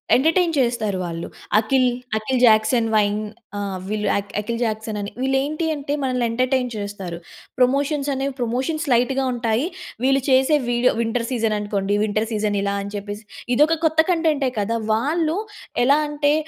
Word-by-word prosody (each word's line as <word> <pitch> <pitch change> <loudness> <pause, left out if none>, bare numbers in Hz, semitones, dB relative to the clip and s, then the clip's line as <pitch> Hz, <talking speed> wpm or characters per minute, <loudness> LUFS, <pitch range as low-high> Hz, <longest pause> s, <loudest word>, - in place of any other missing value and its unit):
Entertain 330 +5 +3
చేస్తారు 235 -6 +1
వాళ్ళు. 170 -1 -5 0.3
'Akhil' 255 +4 +3 0.3
'Akhil 245 +4 -1
Jackson 225 +1 +4
wine' 210 0 +2 0.4
ఆహ్, 200 -2 -3
వీళ్ళు 210 0 -2 0.3
'అఖిల్ 230 +3 -3
జాక్సన్' 220 -1 -2
అని 200 0 -4
వీళ్ళు 265 +1 +2
ఏంటి 305 +3 -2
అంటే 285 0 -3
మనల్ని 250 -2 0
ఎంటర్టైన్ 255 +1 +1
చేస్తారు. 200 -4 -5 0.4
ప్రమోషన్స్ 280 +3 +2
అనేవి 270 +1 -2
ప్రమోషన్స్ 260 +7 -1
లైట్‌గా 260 +3 +2
ఉంటాయి. 235 +3 0 0.4
వీళ్ళు 270 +1 +3
చేసే 265 +3 +4
వీడియో 240 +1 +3
వింటర్ 230 +1 0
సీజన్ 225 -3 +1
అనుకోండి 205 -1 -1
వింటర్ 215 +1 0
సీజన్ 210 -1 0
ఇలా 200 0 -1
అని 200 +1 -7
చెప్పేసి, 205 +1 -6 0.3
ఇది 270 +5 +5
ఒక 330 - +1
కొత్త 320 0 +2
కంటెంటే 315 -6 +2
కదా! 230 +3 0 0.2
వాళ్ళు 315 - 0 0.5
ఎలా 280 +3 +5
అంటే 290 0 +1
240 Hz, 155 wpm, -22 LUFS, 215-275 Hz, 0.5 s, ఇది